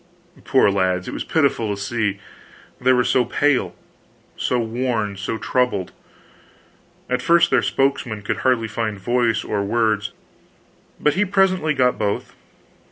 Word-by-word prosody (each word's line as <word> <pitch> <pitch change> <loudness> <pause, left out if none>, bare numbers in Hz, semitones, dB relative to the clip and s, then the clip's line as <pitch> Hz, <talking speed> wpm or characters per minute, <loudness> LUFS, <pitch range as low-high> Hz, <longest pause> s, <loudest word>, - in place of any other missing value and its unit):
Poor 130 -7 +4
lads, 95 -2 0
it - - -5
was - - -4
pitiful 140 -8 +1
to - - -10
see, 105 -1 -1 0.6
they 130 +1 +3
were 125 -1 +3
so 125 +1 +2
pale, 125 -7 0 0.6
so 125 - -1
worn, 115 -3 -2
so 100 +3 -4
troubled. 110 -4 -1 1.2
At 125 - -1
first 170 0 +4
their - - +4
spokesman 130 -6 -1
could - - -2
hardly 125 -4 +1
find 110 -1 -3
voice 120 +2 +1
or 100 -1 -2
words; 110 -1 0 0.9
but 150 - +2
he 200 - +2
presently 185 -5 +1
got 125 -1 +2
both. 100 -1 -2
120 Hz, 140 wpm, -21 LUFS, 105-130 Hz, 1.2 s, Poor